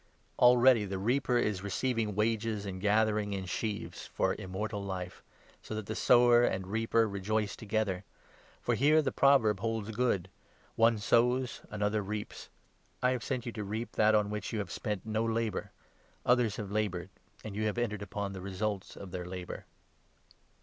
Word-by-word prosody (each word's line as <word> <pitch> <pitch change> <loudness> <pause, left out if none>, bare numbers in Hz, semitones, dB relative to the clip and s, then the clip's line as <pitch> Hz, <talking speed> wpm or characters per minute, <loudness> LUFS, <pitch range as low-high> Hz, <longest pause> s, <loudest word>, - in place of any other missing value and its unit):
Already 125 -2 +6
the 95 -1 -3
reaper 120 +5 +1
is 105 -4 +1
36 - - -11
receiving 110 0 -1
wages 110 -1 0
and 95 -2 -5
gathering 105 0 +2
in 95 -1 -3
sheaves 105 +3 -4
for - - 0
Immortal 100 +2 -4
Life, 90 -2 -5 0.4
so 110 - -5
that 110 +1 -5
sower 120 0 +5
and 95 -5 0
reaper 115 +3 +1
rejoice 105 +1 -1
together. 100 -3 -1 0.6
For - - +1
here 155 +3 +4
the 135 - 0
37 - - -19
proverb 125 -8 +4
holds 110 0 -2
good 110 -5 0 0.3
— - - -32
'One 115 0 +4
sows, 120 +4 +2
another 105 +1 0
reaps.' 105 +1 -6 0.5
I 125 - +4
have 125 -2 -1
38 - - -7
sent 125 -1 -2
you 120 - -3
to 110 -2 -5
reap 110 +4 -4
that 110 0 +4
on 105 -1 +2
which 105 -1 -4
you 115 - -2
have 100 -5 -3
spent 105 -2 -3
no 110 0 0
labour; 115 -2 -1 0.6
others 120 -4 +3
have 100 -2 -6
laboured, 95 -4 -2 0.3
and 110 -2 -6
you 110 +1 0
have 105 - -2
entered 110 -3 -1
upon 100 0 -4
the 95 - -7
results 100 +1 -3
of 95 -2 -9
their 90 -1 -5
labour." 90 -1 -7
105 Hz, 175 wpm, -31 LUFS, 100-115 Hz, 0.6 s, Already